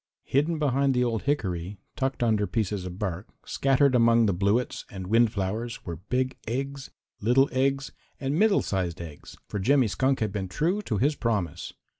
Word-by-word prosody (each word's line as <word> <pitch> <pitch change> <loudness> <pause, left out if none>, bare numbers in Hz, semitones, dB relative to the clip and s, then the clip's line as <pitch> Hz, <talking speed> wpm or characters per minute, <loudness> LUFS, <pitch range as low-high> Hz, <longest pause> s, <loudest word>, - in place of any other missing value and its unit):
Hidden 150 +5 +1
behind 140 -2 +2
the 125 - +3
old 115 -3 0
hickory, 100 - -1 0.2
tucked 135 -3 -1
under 110 -3 +2
pieces 105 -4 -2
of 90 0 -8
bark, 95 -1 -3 0.2
scattered 135 0 +2
among 115 -1 +5
the 100 - +2
bluets 100 +7 0
and 95 -2 -7
wind 115 +3 +3
flowers 110 +4 -3
were 85 -2 -5
big 130 +9 -2
eggs, 135 +3 -3 0.3
little 125 +6 +4
eggs 135 +1 0 0.3
and 135 0 -1
middle 200 +5 +3
sized 90 -3 -2
eggs, 80 -4 -10
for 105 - -4
Jimmy 130 +4 +3
Skunk 130 +6 +1
had 110 -3 -1
been 95 -2 -3
true 165 - 0
to 110 - -2
his 140 +8 +2
promise. 105 - -2
115 Hz, 175 wpm, -27 LUFS, 100-135 Hz, 0.3 s, among